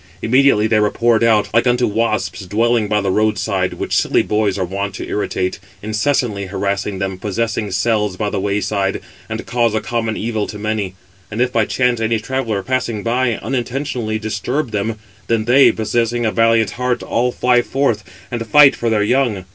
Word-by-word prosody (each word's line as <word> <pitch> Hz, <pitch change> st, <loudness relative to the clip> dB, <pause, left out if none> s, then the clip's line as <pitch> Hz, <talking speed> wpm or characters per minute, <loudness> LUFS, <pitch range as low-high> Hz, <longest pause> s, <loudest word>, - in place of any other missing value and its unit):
Immediately 130 Hz, -2 st, +4 dB
they 110 Hz, -1 st, +3 dB
were 105 Hz, -1 st, +3 dB
poured 115 Hz, 0 st, +2 dB
out, 110 Hz, -3 st, +2 dB
like 115 Hz, +2 st, +3 dB
unto 125 Hz, 0 st, +2 dB
wasps 110 Hz, -2 st, -1 dB
dwelling 115 Hz, +2 st, +1 dB
by 105 Hz, 0 st, +1 dB
the 95 Hz, -1 st, 0 dB
road 110 Hz, +2 st, +1 dB
side, 95 Hz, -3 st, -1 dB
which -, -, -3 dB
silly -, -, +2 dB
boys 105 Hz, -2 st, 0 dB
are 95 Hz, -, -1 dB
wont 100 Hz, +2 st, -4 dB
to -, -, -6 dB
irritate, 95 Hz, -3 st, -2 dB, 0.2 s
incessantly 110 Hz, -2 st, 0 dB
harassing 100 Hz, +1 st, -2 dB
them, 95 Hz, -1 st, -3 dB
possessing 105 Hz, +1 st, -2 dB
cells 105 Hz, 0 st, 0 dB
by 105 Hz, 0 st, -2 dB
the 100 Hz, -, -1 dB
way 100 Hz, +1 st, -1 dB
side; 100 Hz, -2 st, -1 dB, 0.3 s
and -, -, -5 dB
cause 115 Hz, -2 st, +1 dB
a -, -, +2 dB
common 115 Hz, 0 st, -2 dB
evil 110 Hz, -1 st, -2 dB
to 105 Hz, -, -7 dB
many. 105 Hz, -3 st, -3 dB, 0.3 s
And 110 Hz, -, -5 dB
if 125 Hz, 0 st, +1 dB
by 110 Hz, -2 st, +2 dB
chance 125 Hz, 0 st, +1 dB
any 115 Hz, 0 st, +1 dB
traveller, 115 Hz, -4 st, -2 dB
passing 120 Hz, -5 st, -2 dB
by, 120 Hz, 0 st, +1 dB
unintentionally 125 Hz, -3 st, -2 dB
disturb 120 Hz, +5 st, -3 dB
them, 105 Hz, +2 st, -1 dB, 0.3 s
then 115 Hz, -2 st, 0 dB
they, 130 Hz, +4 st, +6 dB
possessing 120 Hz, +2 st, -1 dB
a 110 Hz, -, +1 dB
valiant 115 Hz, -3 st, +3 dB
heart, 125 Hz, +1 st, -2 dB
all 125 Hz, +2 st, 0 dB
fly 125 Hz, 0 st, +2 dB
forth, 120 Hz, -4 st, 0 dB, 0.3 s
and 115 Hz, -2 st, -4 dB
fight 150 Hz, 0 st, +7 dB
for 120 Hz, -, -1 dB
their 105 Hz, -2 st, +2 dB
young. 115 Hz, -5 st, +1 dB
110 Hz, 185 wpm, -18 LUFS, 105-120 Hz, 0.3 s, fight